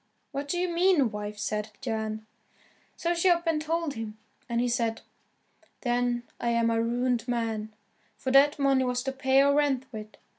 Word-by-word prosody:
"What 280 0 -4
do 350 - -1
you 360 +1 +1
mean, 340 - +3
wife?" 210 0 -5
said 210 +1 -2
Jan. 220 -3 -3 0.7
So 345 +1 0
she 345 +2 +3
up 340 0 +3
and 320 -2 +1
told 325 -1 -1
him, 220 -3 -6 0.3
and 235 0 0
he 245 - +2
said, 235 -2 0 0.8
"Then 240 -1 0 0.2
I'm 235 -1 +2
a 225 0 +2
ruined 240 0 0
man, 225 -3 -2 0.5
for 260 - -2
that 280 +2 +6
money 275 -2 +3
was 250 -1 -1
to 270 - -1
pay 265 0 +3
our 280 0 +4
rent 280 -3 +2
with. 215 -2 -9
250 Hz, 175 wpm, -28 LUFS, 230-285 Hz, 0.8 s, that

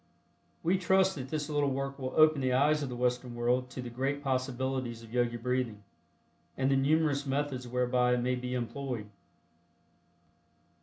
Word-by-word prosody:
We 180 +3 +2
trust 190 +1 +3
that 135 -5 -6
this 150 -1 -2
little 145 -2 +1
work 135 +1 -3
will 130 -1 -4
open 155 -2 +5
the 130 -1 +1
eyes 150 +4 +3
of 140 - -3
the 125 - -5
Western 125 0 -1
world 125 +2 +1
to 125 0 -6
the 120 - -6
great 135 +4 -2
possibilities 130 -2 -2
of 115 0 -13
Yogi 120 -1 +1
Breathing, 120 -3 -2 0.7
and 135 +1 +2
the - - +4
numerous 145 0 +2
methods 135 -2 -2
whereby 125 0 +2
it 120 - -1
may 125 +1 +1
be 125 0 -3
employed. 125 -2 -3
130 Hz, 165 wpm, -31 LUFS, 125-140 Hz, 0.7 s, open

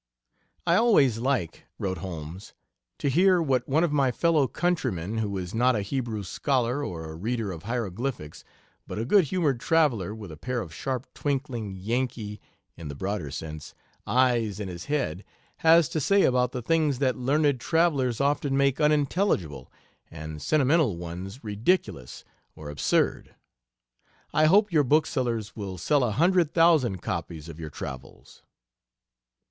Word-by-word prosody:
"I 170 0 +4
always 145 - +4
like," 125 - -1
wrote 95 -1 -3
Holmes, 85 0 -8 0.4
"to - - -2
hear 180 +6 +4
what 130 -6 0
one 155 +5 +3
of 170 - +1
my 135 -3 +3
fellow 155 +1 +2
countrymen, 115 - -1
who 100 -3 -2
is 90 -1 -5
not 125 +2 +3
a 105 - -1
Hebrew 115 -1 -3
scholar, 130 +6 -1
or 80 - -5
a - - -8
reader 110 +3 -2
of 85 0 -9
hiero 115 -4 -2
glyphics, 105 - -5 0.4
but - - -6
a 110 - -2
good 190 - +4
humored 150 -6 0
traveler 120 - +1
with 105 -6 -9
a 75 - -10
pair 125 +8 -3
of 85 -8 -7
sharp, 130 - -3
twinkling 130 -8 -3
Yankee 110 +1 -3 0.3
(in 85 -2 -8
the 70 - -6
broader 95 -2 -3
sense) 75 +1 -7 0.3
eyes 120 -3 +2
in 105 - -4
his 85 -1 -7
head, 105 - -2 0.3
has 165 -1 +5
to 155 - -2
say 200 +7 +3
about 125 -1 +2
the 125 -3 -5
things 155 -1 +1
that 130 -1 +1
learned 140 +1 +1
travelers 140 -6 +1
often 140 0 +1
make 140 +1 +2
unintelligible, 145 - +1 0.4
and 80 -1 -8
sentimental 140 - +2
ones 90 +7 -7
ridiculous 105 - -1 0.3
or 75 -2 -8
absurd.... 75 - 0 1.0
I 155 - +4
hope 205 +5 +4
your 155 -3 +4
booksellers 125 -7 0
will 100 -4 -6
sell 140 - +2
a 120 - +1
hundred 170 - +2
thousand 155 - +3
copies 85 -2 -4
of 85 -1 -10
your 80 -2 -6
travels." 65 -2 -9
125 Hz, 155 wpm, -26 LUFS, 95-145 Hz, 1.0 s, has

